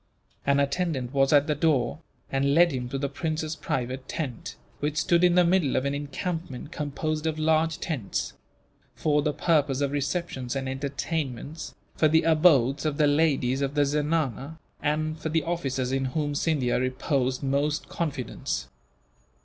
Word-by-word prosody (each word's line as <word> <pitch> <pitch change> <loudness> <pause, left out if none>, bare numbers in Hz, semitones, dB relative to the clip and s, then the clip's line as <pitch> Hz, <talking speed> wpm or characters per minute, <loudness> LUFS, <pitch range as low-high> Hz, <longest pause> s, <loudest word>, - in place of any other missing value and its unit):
An 140 0 +4
attendant 140 -3 -1
was 135 -1 +3
at 145 -1 +5
the 150 - +1
door, 150 -2 +1 0.3
and 140 +1 +2
led 170 0 +6
him 125 -2 -3
to 135 - -3
the 140 +1 -1
prince's 155 +2 -3
private 130 -1 -3
tent, 135 -8 -5 0.2
which 150 +1 -2
stood 170 +3 +3
in 175 -1 +5
the 180 - +6
middle 170 -5 +2
of 130 - +1
an 140 - 0
encampment 145 0 -4
composed 155 +1 -2
of 155 -1 -1
large 160 0 +2
tents; 135 - -3 0.6
for 150 -1 +2
the 150 0 +1
purpose 145 -4 +1
of 140 -1 0
receptions 145 -3 -2
and 135 -1 -2
entertainments, 140 +1 -4 0.2
for 155 - +4
the 160 +1 +4
abodes 155 -5 +4
of 150 -2 -1
the 150 - +4
ladies 145 -3 +2
of 140 +1 -1
the 145 -1 +4
zenana, 150 -1 -1 0.2
and 155 +1 -1
for 160 - -3
the 160 0 +1
officers 135 -7 -2
in 135 0 0
whom 145 +2 -1
Scindia 145 -5 +1
reposed 130 +1 -1
most 145 +3 0
confidence. 130 - -3
145 Hz, 160 wpm, -26 LUFS, 135-160 Hz, 0.6 s, led